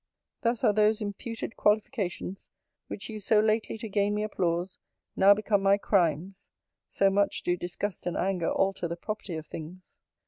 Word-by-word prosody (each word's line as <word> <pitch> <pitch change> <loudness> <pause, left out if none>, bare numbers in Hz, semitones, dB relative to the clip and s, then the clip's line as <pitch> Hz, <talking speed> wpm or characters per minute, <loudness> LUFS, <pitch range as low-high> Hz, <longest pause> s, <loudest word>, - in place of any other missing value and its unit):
Thus 235 0 0
are 210 - +5
those 215 +1 +3
imputed 225 +2 -5
qualifications, 210 -3 -1 0.4
which 200 - -6
used 215 -3 -5
so 215 - +5
lately 220 +1 +1
to 225 0 -6
gain 205 0 +1
me 210 - -1
applause, 180 -3 -1 0.4
now 200 +1 +7
become 210 -1 +1
my 195 +1 +4
crimes: 185 -1 0 0.4
so 195 0 +3
much 200 +1 +1
do 175 - +1
disgust 180 +2 -4
and 175 - -2
anger 185 -3 0
alter 195 -2 0
the 170 +1 -5
property 210 -1 -5
of 160 0 -6
things. 175 +5 -10
200 Hz, 165 wpm, -28 LUFS, 180-215 Hz, 0.4 s, now